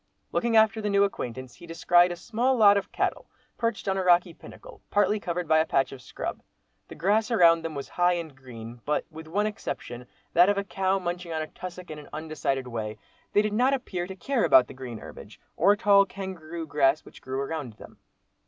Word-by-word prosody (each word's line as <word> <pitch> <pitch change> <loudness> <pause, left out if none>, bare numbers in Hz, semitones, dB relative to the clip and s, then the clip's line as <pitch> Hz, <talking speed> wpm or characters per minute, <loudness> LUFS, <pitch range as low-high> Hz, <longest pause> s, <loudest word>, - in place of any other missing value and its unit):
Looking 235 -2 +1
after 220 0 +4
the 210 - -1
new 200 0 +4
acquaintance 130 -9 -4
he 170 - -13
descried 175 +2 +3
a - - -3
small 240 +8 0
lot 205 -3 +7
of 200 - -2
cattle - - -2 0.3
perched 230 -3 -2
on 195 0 +1
a - - 0
rocky 175 -1 +4
pinnacle, - - -14
partly 205 +1 +2
covered 180 -3 -3
by 160 0 +4
a 160 - +3
patch 135 - +1
of 135 - -10
scrub. - - -6 0.5
The - - -10
grass 210 +8 +1
around 170 -7 +5
them 165 -1 -5
was 140 - -5
high 175 0 +2
and 165 -5 -5
green—but, 120 +1 -5
with 160 0 -10
one 205 +6 0
exception, 125 - -5 0.3
that 175 +3 +6
of 205 - +1
a 200 - 0
cow 190 0 0
munching 175 -1 -4
a 160 -1 -2
tussac 180 +1 -9
in 155 - -7
an 150 - -13
undecided 155 -4 -3
way, 110 -3 -5 0.4
they 205 - +4
did 210 -1 -2
not 255 +5 +3
appear 185 -9 -4
to 190 - -7
care 245 +6 -1
about 130 -1 +6
the - - -11
green 130 -3 -7
herbage, - - -12 0.2
or 205 - +4
tall 200 -1 +5
kangaroo 170 -4 -7
grass 145 0 +2
which - - -15
grew 130 +1 -4
around 140 -4 -4
them. 105 - -15
175 Hz, 210 wpm, -27 LUFS, 145-200 Hz, 0.5 s, lot